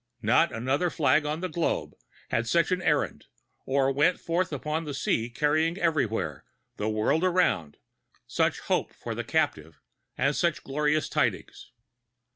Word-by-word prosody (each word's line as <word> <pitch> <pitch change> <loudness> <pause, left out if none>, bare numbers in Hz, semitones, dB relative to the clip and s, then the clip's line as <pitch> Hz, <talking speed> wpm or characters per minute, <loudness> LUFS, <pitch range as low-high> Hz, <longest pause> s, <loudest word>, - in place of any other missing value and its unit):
Not 125 +10 +4
another 130 +9 0
flag 150 -1 +2
on 155 +3 -2
the 185 - -1
globe 170 -1 -2 0.4
had 115 +1 0
such 170 +7 +2
an 185 0 +1
errand, - - 0 0.4
or 135 0 +2
went 145 +6 +2
forth 170 +1 -1
upon 150 +3 -2
the 145 -3 -5
sea 115 -3 0
carrying 155 +6 +1
everywhere, 155 - -1 0.3
the 105 - -1
world 110 +10 +1
around, 175 - +1 0.5
such - - 0
hope - - -1
for - - -6
the - - -4
captive, 80 +1 -1 0.4
and 140 +2 +1
such 170 -3 0
glorious 150 +2 0
tidings. - - -2
150 Hz, 145 wpm, -27 LUFS, 125-165 Hz, 0.5 s, Not